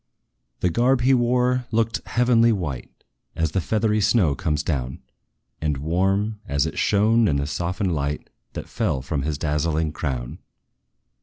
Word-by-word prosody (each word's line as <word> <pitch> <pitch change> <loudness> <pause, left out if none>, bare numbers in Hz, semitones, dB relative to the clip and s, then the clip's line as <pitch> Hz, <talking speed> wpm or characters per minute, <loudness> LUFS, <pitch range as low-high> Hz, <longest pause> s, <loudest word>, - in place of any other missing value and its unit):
The 90 - +2
garb 125 +6 +2
he 130 +2 +4
wore 125 0 +2
looked 115 +1 0
heavenly 120 -1 +3
white, 75 - -3 0.5
As 80 -2 0
the 95 - 0
feathery 110 +3 +1
snow 100 -7 +3
comes 75 -3 -1
down, 65 -5 -3 0.6
And 75 -2 0
warm, 95 +8 0
as 70 -2 +1
it - - -4
shone 110 +2 +3
in 75 - +1
the 70 0 0
softened 90 +5 -2
light 75 -1 -3 0.2
That - - -6
fell 85 - -1
from 70 +1 -2
his 75 +1 -2
dazzling 75 +1 0
crown. 65 -6 -4
90 Hz, 150 wpm, -23 LUFS, 75-115 Hz, 0.6 s, he